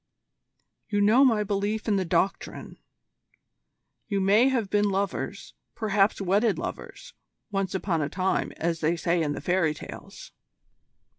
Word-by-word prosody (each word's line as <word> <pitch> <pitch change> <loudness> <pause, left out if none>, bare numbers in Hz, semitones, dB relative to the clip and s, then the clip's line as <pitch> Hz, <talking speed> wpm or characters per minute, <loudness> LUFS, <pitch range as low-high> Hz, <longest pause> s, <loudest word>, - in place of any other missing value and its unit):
You 205 -1 0
know 215 +6 +5
my 225 -6 +3
belief 205 +2 -2
in 210 - +2
the 190 - 0
Doctrine. 175 +3 -2 1.3
You 200 -2 -1
may 205 +7 +4
have 240 -6 0
been 205 0 +2
lovers 195 0 -3 0.2
perhaps 210 -2 +1
wedded 200 +3 +2
lovers - - -7 0.4
once 195 -1 -2
upon 180 -4 -1
a 145 - -1
time, 185 +4 -1
as 165 0 -2
they 160 +2 +1
say 170 +1 0
in 150 -2 0
the - - -6
fairy 175 -4 +1
tales." - - -10
195 Hz, 140 wpm, -26 LUFS, 175-210 Hz, 1.3 s, know